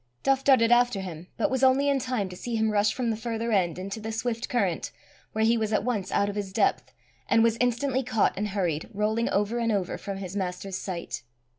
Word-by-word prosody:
Duff 270 0 +2
darted 240 -4 +5
after 240 -3 +4
him, 175 -2 -7
but 230 - +1
was 260 -1 0
only 265 +2 +4
in 280 -1 +3
time 250 -6 -1
to 180 - -8
see 235 +5 -4
him 220 -1 +1
rush 205 0 +3
from 245 -3 -1
the - - -1
further 230 0 -3
end 180 -5 +1
into 195 +4 -5
the 220 +1 -5
swift 230 +1 -2
current, 195 -9 0 0.4
where 220 - +1
he 230 +1 +3
was 220 -1 -1
at 210 - +1
once 215 -6 -2
out 200 - +2
of 205 - -4
his 200 -2 -3
depth, - - +1 0.4
and 225 - +5
was 230 -1 +3
instantly 250 +2 +1
caught 245 -4 +1
and 210 +2 -1
hurried, 180 -6 -2
rolling 215 +3 +1
over 210 +4 0
and 230 -1 +1
over, 195 -4 -1
from 195 -1 -5
his 190 -1 -6
master's 190 0 -3
sight. 180 -3 -4
220 Hz, 230 wpm, -27 LUFS, 195-240 Hz, 0.4 s, darted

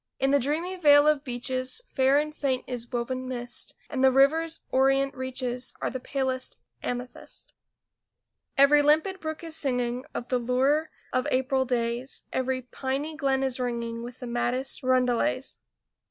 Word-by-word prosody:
In 270 0 +2
the 285 - +5
dreamy 325 +8 -2
vale 290 -3 +6
of 300 -2 +3
beeches 255 - -1
Fair 265 +1 +3
and 305 +1 -1
faint 265 -4 -1
is 245 -1 -5
woven 255 +1 -2
mist, 245 -1 -5
And 265 -3 -2
the 265 - +7
river's 315 +5 +3
orient 270 +1 +3
reaches 260 -1 -3
Are - - -2
the 260 - -4
palest 260 0 -3 0.2
amethyst. 245 0 -6 1.0
Every 285 +2 +7
limpid 315 +6 +2
brook 315 0 -5
is 325 -1 -5
singing 250 -3 0
Of 245 - -4
the 250 - +1
lure 265 +6 +1 0.2
of 255 - +1
April 260 +1 +1
days; 240 +1 -1
Every 260 0 -1
piney 270 +5 -3
glen 270 -3 +1
is 265 -1 -1
ringing 235 -2 -3
With 240 +1 -8
the - - -4
maddest 245 +2 -1
roundelays. 250 - +1
260 Hz, 155 wpm, -27 LUFS, 250-285 Hz, 1.0 s, the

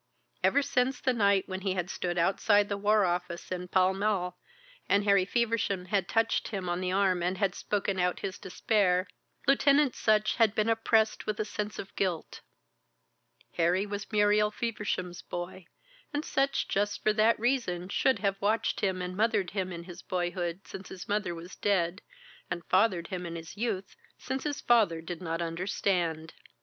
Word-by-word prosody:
Ever 285 - +4
since 260 -1 +1
the 255 - +1
night 200 -4 +3
when 190 0 -5
he 190 -1 0
had 180 0 -2
stood 175 -1 -3
outside 205 +4 +3
the 200 - 0
War 210 0 +3
Office 175 0 -3
in 180 0 -3
Pall 185 +1 +3
Mall, 190 -3 -1 0.5
and 200 +1 +4
Harry 200 -2 +4
Feversham 220 -4 0
had 195 -2 0
touched 225 0 +1
him 195 -4 -4
on 175 +1 -1
the 185 0 -1
arm 190 -2 +2
and 180 +2 -1
had 195 -2 +1
spoken 200 -2 -2
out 180 0 0
his 190 -1 -4
despair, 185 -1 +1 0.4
Lieutenant 280 0 +4
Sutch 215 -1 +2
had 225 -3 +4
been 215 +1 +1
oppressed 225 -1 +2
with 215 -1 -2
a 215 - 0
sense 210 0 -4
of 195 - -8
guilt. 180 -5 -2 1.2
Harry 175 +3 +2
was 205 +1 -6
Muriel 210 0 +4
Feversham's 210 -5 -3
boy, 175 0 -7 0.4
and 295 +1 -2
Sutch 275 +1 0
just 205 +1 -1
for 215 - +3
that 220 +1 +3
reason 230 -8 0
should 260 +6 +2
have 195 -1 -1
watched 215 +3 +1
him 185 -2 0
and 180 0 -5
mothered 210 -3 +1
him 190 -2 -2
in 170 -1 -6
his 175 0 -10
boyhood 175 -1 -2
since 190 - -9
his 185 - -8
mother 205 -4 -1
was 170 +3 -9
dead, 185 -2 0 0.5
and 175 -1 -4
fathered 185 -4 +2
him 180 -2 -4
in 170 - -6
his 165 +1 -8
youth 200 -4 -3 0.2
since 265 +2 -4
his 295 -1 -2
father 215 -9 +3
did 165 +1 -7
not 165 -1 -2
understand. 170 -2 -1
195 Hz, 175 wpm, -29 LUFS, 180-215 Hz, 1.2 s, Ever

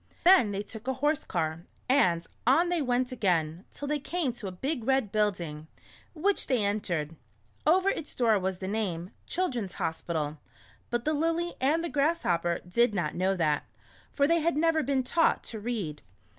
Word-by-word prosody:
Then 360 - +7
they 200 0 -3
took 220 +3 -10
a 265 - 0
horse 295 +3 +1
car, 165 -1 -2 0.2
and 180 -11 +3 0.2
on 325 +7 +5
they 350 -2 +1
went 250 -1 0
again, 175 -6 0
till 285 - -6
they 300 0 0
came 305 -3 -1
to 230 -4 -7
a - - -4
big 265 - -3
red 265 -4 +1
building, 175 -8 -1 0.5
which 390 +6 +1
they 245 -6 +2
en 205 +1 +1
tered. 165 -5 -3 0.5
Over 375 +4 +5
its 320 -6 -4
door 225 -4 +3
was 190 0 -2
the 190 - -5
name, 190 -4 -2
" - - -37
Children's 245 - -2
Hospital," 160 -2 -2 0.5
but 240 0 -2
the 310 - +2
Lily 330 +3 0
and 305 +5 +2
the - - -1
Grasshopper 275 - +1
did 220 +4 +2
not 160 -5 -1
know 190 +2 +1
that, 155 -4 +1 0.5
for 280 - +2
they 335 +1 +3
had 330 -1 +1
never 325 0 +3
been 270 -1 0
taught 325 +6 +2
to 220 - -6
read. 205 -10 -3
235 Hz, 185 wpm, -29 LUFS, 180-300 Hz, 0.5 s, Then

